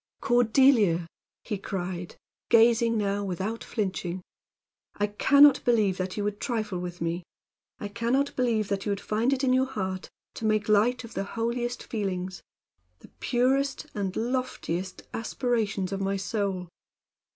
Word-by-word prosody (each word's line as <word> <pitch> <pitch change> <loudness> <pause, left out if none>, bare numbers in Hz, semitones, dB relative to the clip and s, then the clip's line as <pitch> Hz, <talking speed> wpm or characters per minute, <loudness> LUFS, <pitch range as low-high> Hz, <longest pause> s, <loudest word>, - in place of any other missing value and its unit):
"Cordelia!" 235 -7 +4 0.4
he 210 -4 -3
cried, 180 -2 -4 0.3
gazing 230 0 +5
now 205 -1 0
without 195 +4 -3
flinching, 185 -4 -3 0.7
"I 205 - +1
can 265 +7 +5
not 290 -1 +7
believe 215 -6 +2
that 185 +2 -3
you 205 - -1
would 205 0 -2
trifle 215 -7 -2
with 180 -1 -6
me. 170 +1 -1 0.6
I 205 - -5
can 230 +3 -2
not 280 +1 +1
believe 230 -5 +1
that 200 0 -2
you 205 - +2
could 200 - -4
find 220 +6 0
it 275 0 0
in 255 -1 +3
your 260 +1 +3
heart 190 -7 -4 0.2
to 225 - -5
make 215 -1 +1
light 220 +4 +3
of 230 - -10
the - - -2
holiest 235 +3 -2
feelings 190 -4 -3 0.6
the - - -17
purest 265 +3 +1
and 195 -2 -3
loftiest 230 -7 -3
aspirations 220 -5 -1
of 195 0 -2
my 195 0 0
soul. 195 -2 -2
210 Hz, 150 wpm, -27 LUFS, 190-240 Hz, 0.7 s, not